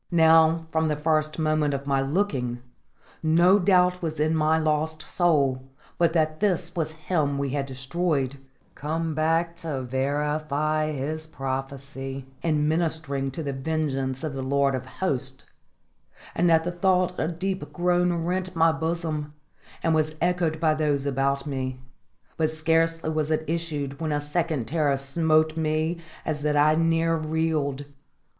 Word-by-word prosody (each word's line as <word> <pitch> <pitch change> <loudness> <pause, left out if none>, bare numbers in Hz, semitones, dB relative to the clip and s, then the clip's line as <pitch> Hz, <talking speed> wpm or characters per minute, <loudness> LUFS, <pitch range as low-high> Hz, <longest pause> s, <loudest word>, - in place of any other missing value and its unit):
Now, 160 -1 +5
from 160 0 +1
the 150 - 0
first 155 0 0
moment 155 -2 +1
of 140 0 -5
my 135 -1 +1
looking, 135 -6 -1 0.6
no 170 +5 +5
doubt 180 -1 +3
was 160 -3 -3
in 155 +2 +2
my 155 0 +3
lost 155 0 0
soul 140 -7 +2 0.4
but 170 -1 +4
that 155 -2 +1
this 180 -4 0
was 160 -2 -2
him 145 -6 +1
we 140 0 -1
had 140 0 -2
destroyed 135 0 -1 0.3
come 160 +2 -2
back 165 +2 +1
to 155 -6 -4
verify 150 +3 -1
his 155 +3 -4
prophecy 135 -1 -5 0.2
in 150 -3 +1
ministering 155 -4 0
to 145 +5 -5
the 140 -1 -3
vengeance 135 -2 -2
of 155 -3 -3
the 135 - -4
Lord 140 +1 +1
of 130 0 -4
Hosts; 135 -6 -3 0.9
and 175 0 +2
at 160 0 +5
the 175 - -2
thought 180 0 +1
a - - +1
deep 185 +3 -3
groan 180 0 +2
rent 185 0 -2
my 165 0 +5
bosom, 160 -2 -3 0.5
and 165 - +2
was 155 0 +1
echoed 170 -2 0
by 160 -1 +3
those 150 -3 0
about 140 0 0
me. 130 -3 -3 0.6
But 155 -1 +2
scarcely 165 0 +1
was 155 -1 -1
it 155 0 +1
issued 150 -4 -3
when 160 -1 -1
a 145 - +1
second 150 -4 -1
terror 145 -1 +1
smote 155 +3 +2
me 160 +1 0 0.3
as 150 -2 -2
that 150 0 +1
I 150 +1 +5
near 165 +1 +2
reeled. 155 -3 -1
155 Hz, 150 wpm, -25 LUFS, 140-165 Hz, 0.9 s, Now